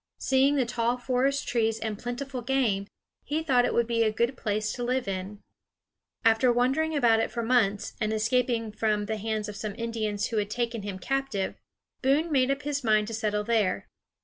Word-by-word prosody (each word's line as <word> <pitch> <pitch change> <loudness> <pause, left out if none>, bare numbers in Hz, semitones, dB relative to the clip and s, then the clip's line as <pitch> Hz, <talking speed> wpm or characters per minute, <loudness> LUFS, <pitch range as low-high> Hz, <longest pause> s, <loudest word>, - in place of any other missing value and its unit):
Seeing 270 +2 +3
the 265 -3 +2
tall 235 +1 0
forest 260 +3 0
trees 225 -2 +1
and 220 -2 -3
plentiful 250 +2 -4
game, 235 -6 0 0.4
he 310 +2 -2
thought 255 -5 +3
it - - 0
would 235 - +3
be 230 0 0
a 220 -1 +3
good 235 +4 0
place 215 -2 -1
to 245 - -4
live 250 -1 0
in. 195 +2 -5 0.8
After 225 +3 +5
wandering 270 +7 +1
about 235 -5 +4
it - - 0
for 235 - -3
months, 220 -4 +1
and 215 0 +1
escaping 225 +1 +1
from 210 -1 0
the 220 +1 -2
hands 215 0 -2
of 210 - -7
some 205 0 -5
Indians 220 -3 -2
who 230 - -2
had 205 -1 0
taken 235 0 -2
him 200 -2 -5
captive, 270 -1 -2 0.5
Boone 290 +5 +2
made 265 -2 +3
up 275 +1 -1
his 285 -1 -2
mind 215 -1 +3
to - - -5
settle 210 -1 -1
there. 210 - 0
230 Hz, 195 wpm, -27 LUFS, 215-255 Hz, 0.8 s, After